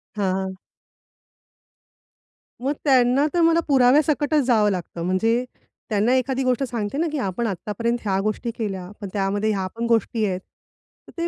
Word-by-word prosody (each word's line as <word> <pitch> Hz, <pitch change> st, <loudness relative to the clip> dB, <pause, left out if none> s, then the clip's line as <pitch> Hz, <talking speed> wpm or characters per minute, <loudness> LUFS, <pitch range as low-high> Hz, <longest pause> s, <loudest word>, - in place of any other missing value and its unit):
हां. 190 Hz, -2 st, -1 dB, 2.0 s
मग 275 Hz, +3 st, 0 dB
त्यांना 260 Hz, 0 st, +4 dB
तर 350 Hz, -, +2 dB
मला 330 Hz, 0 st, +4 dB
पुराव्यासकटच 290 Hz, +3 st, +3 dB
जावं 220 Hz, -4 st, +3 dB
लागतं. 175 Hz, -2 st, -5 dB
म्हणजे 225 Hz, +7 st, +1 dB, 0.5 s
त्यांना 215 Hz, +3 st, +2 dB
एखादी 260 Hz, +1 st, 0 dB
गोष्ट 255 Hz, +1 st, +1 dB
सांगते 235 Hz, -2 st, -3 dB
ना, 335 Hz, +3 st, +1 dB
की 300 Hz, -, -2 dB
"आपण 210 Hz, +6 st, -2 dB
आत्तापर्यंत 215 Hz, +5 st, -2 dB
ह्या 195 Hz, -2 st, 0 dB
गोष्टी 215 Hz, +3 st, -2 dB
केल्या 195 Hz, -5 st, -4 dB
पण 200 Hz, -, -4 dB
त्यामध्ये 205 Hz, +2 st, 0 dB
ह्या 190 Hz, -3 st, -1 dB
पण 235 Hz, +1 st, -2 dB
गोष्टी 225 Hz, -1 st, +1 dB
आहेत." 185 Hz, -2 st, -1 dB, 0.7 s
तर -, -, -13 dB
ते 335 Hz, -, -1 dB
230 Hz, 150 wpm, -23 LUFS, 200-260 Hz, 2.0 s, त्यांना